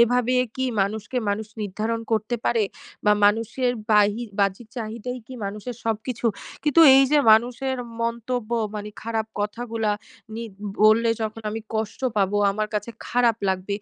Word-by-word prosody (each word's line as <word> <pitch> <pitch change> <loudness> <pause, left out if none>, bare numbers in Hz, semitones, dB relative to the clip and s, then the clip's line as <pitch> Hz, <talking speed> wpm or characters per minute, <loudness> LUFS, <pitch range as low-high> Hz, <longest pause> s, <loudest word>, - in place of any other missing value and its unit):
এভাবে 245 +1 +3 0.2
কি 260 - 0 0.2
মানুষকে 215 +5 -2
মানুষ 210 +1 -2 0.2
নির্ধারণ 215 +3 -2
করতে 220 +2 0
পারে? 230 -2 +2 0.4
বা 210 - +6
মানুষের 230 +4 +2 0.2
বাহি 210 +2 +4 0.2
বাহ্যিক 200 +3 0
চাহিদাই 235 +2 -4
কি 260 - -9
মানুষের 210 +4 -5
সবকিছু? 225 +2 -2 0.4
কিন্তু 300 +2 +4 0.2
এইযে 270 +2 +5
মানুষের 250 +4 +2 0.3
মন্তব্য, 235 0 -2 0.2
মানে 210 0 -5
খারাপ 225 -1 -2
কথাগুলা 225 0 -2 0.4
নি 230 - -4 0.4
বললে 220 +2 +5
যখন 220 +1 -4
আমি 220 +1 -4
কষ্ট 220 -1 -3 0.2
পাবো, 200 0 +2 0.2
আমার 215 +1 -2
কাছে 210 +3 -2 0.2
খারাপ 240 -2 +3
লাগবে, 190 +1 -1
225 Hz, 140 wpm, -24 LUFS, 210-245 Hz, 0.4 s, বা